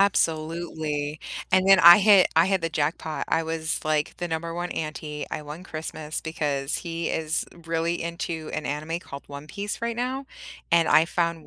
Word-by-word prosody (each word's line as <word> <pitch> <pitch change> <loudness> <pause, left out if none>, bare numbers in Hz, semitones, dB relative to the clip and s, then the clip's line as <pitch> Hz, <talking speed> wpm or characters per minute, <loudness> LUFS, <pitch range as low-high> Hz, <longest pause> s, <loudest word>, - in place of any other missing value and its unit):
Absolutely, 160 -4 0 0.3
and 185 0 +4
then 195 -1 +8
I 175 +1 +10
hit 205 -2 +6
I 165 +2 +6
hit 190 -1 +1
the 165 - -1
jackpot. 155 0 -2
I 165 - +1
was, 160 0 -2
like, 155 -1 0
the 175 -1 -3
number 165 +1 -3
1 175 +1 -3
auntie, 155 -1 -4
I 150 - -4
won 150 +5 -9
Christmas 155 -2 -5
because 150 -2 -2
he 170 -1 -3
is 160 0 0 0.2
really 165 +1 -1
into 170 -2 -4
an 155 - -3
anime 155 +4 -3
called 140 -5 -9
One 140 +1 -9
Piece 205 +5 -5
right 235 -1 -2
now, 260 +3 -2 0.4
and 170 -1 +4
I 160 - +6
found 170 -2 -1
165 Hz, 180 wpm, -25 LUFS, 155-175 Hz, 0.4 s, I